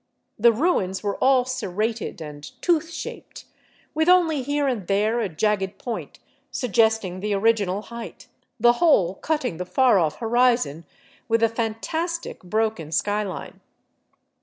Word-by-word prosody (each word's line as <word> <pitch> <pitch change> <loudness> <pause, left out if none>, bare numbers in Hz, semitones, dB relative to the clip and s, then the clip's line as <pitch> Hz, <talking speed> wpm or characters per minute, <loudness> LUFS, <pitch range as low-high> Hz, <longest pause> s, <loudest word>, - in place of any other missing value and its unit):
The 235 +2 +6
ruins 215 - 0
were 205 -1 -1
all 260 -2 +4
serrated 225 -5 -3
and 150 -1 -9
tooth 330 -2 +2
shaped, 335 - -8 0.5
with 315 +2 +2
only 335 -5 +4
here 285 +2 0
and 225 -9 -2
there 210 +4 +1
a 215 -4 -1
jagged 195 +3 -1
point 240 -2 -6 0.3
suggesting 220 -5 +1
the 205 +1 -1
original 205 -2 +1
height, 235 0 -9 0.3
the 240 +2 +6
whole 205 - +4
cutting 260 - -2
the 180 - -3
far 255 -2 +4
off 155 -3 0
horizon 235 - +1 0.4
with 230 0 +2
a 230 - +5
fantastic, 245 +10 -3
broken 215 -4 -2
sky 205 +6 0
line. 190 -4 -7
225 Hz, 135 wpm, -24 LUFS, 195-255 Hz, 0.5 s, The